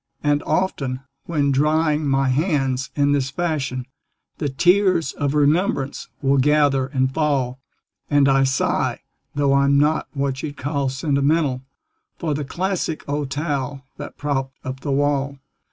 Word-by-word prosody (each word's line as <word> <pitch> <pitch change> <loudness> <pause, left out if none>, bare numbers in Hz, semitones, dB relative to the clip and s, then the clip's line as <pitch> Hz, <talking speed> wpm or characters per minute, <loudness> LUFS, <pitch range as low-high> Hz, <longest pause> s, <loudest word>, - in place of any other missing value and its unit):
And 145 0 +2
often, 140 -7 -1 0.2
when 145 -4 +1
drying 150 +2 +2
my 135 -1 +2
hands 135 -3 0
in 145 -1 +2
this 140 -2 +1
fashion, 135 -5 -2 0.5
The 145 - -1
tears 180 +1 +3
of 145 0 -1
remembrance 145 -1 +1 0.2
will 135 0 +3
gather 145 -1 +3
and 130 -1 0
fall, 135 -5 0 0.5
And 145 -1 +4
I 135 0 +4
sigh 135 0 0 0.3
(though 140 -1 +2
I'm 140 0 +4
not 150 +2 +2
what 140 -2 -2
you'd 145 0 -6
call 140 -1 -1
sentimental) 140 0 +1 0.6
For 160 -4 -1
the 145 +1 -2
classic 175 +1 -2
old 145 -1 -2
towel 140 -2 -3
that - - -8
propped 135 -2 -2
up 130 0 -5
the 140 - -5
wall. 140 0 0
140 Hz, 140 wpm, -22 LUFS, 135-150 Hz, 0.6 s, And